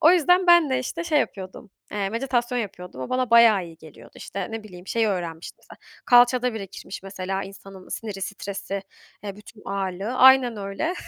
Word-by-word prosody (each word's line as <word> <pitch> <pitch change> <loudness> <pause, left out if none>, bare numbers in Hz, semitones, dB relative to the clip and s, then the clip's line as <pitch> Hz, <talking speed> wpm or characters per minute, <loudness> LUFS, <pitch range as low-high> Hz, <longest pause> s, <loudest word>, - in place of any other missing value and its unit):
O 325 +1 +7
yüzden 360 +1 +4
ben 345 -4 +6
de, 260 - +2
işte, 330 +7 -4
şey 315 -3 +2
yapıyordum, 195 +2 -6 0.2
eee, 200 -2 -1
meditasyon 245 0 -1
yapıyordum. 180 - -6
O 130 - -5
bana 255 -1 0
bayağı 230 -5 +6
iyi 165 -1 -12
geliyordu, 155 -1 -15
işte, 195 0 -6
ne 225 0 -5
bileyim 180 -3 -12
şeyi 225 0 +1
öğrenmiştim 170 -4 -4
mesela, - - -16 0.3
kalçada 245 0 +5
birikirmiş 195 -2 -8
mesela 195 0 -4
insanın 195 -1 -12
siniri, 205 -4 -6
stresi, 195 0 -5 0.4
eee, 200 -1 -6
bütün 210 +1 -15
ağırlığı 195 +3 -3
Aynen 255 -4 +4
öyle. 200 - -3
205 Hz, 175 wpm, -24 LUFS, 195-250 Hz, 0.4 s, O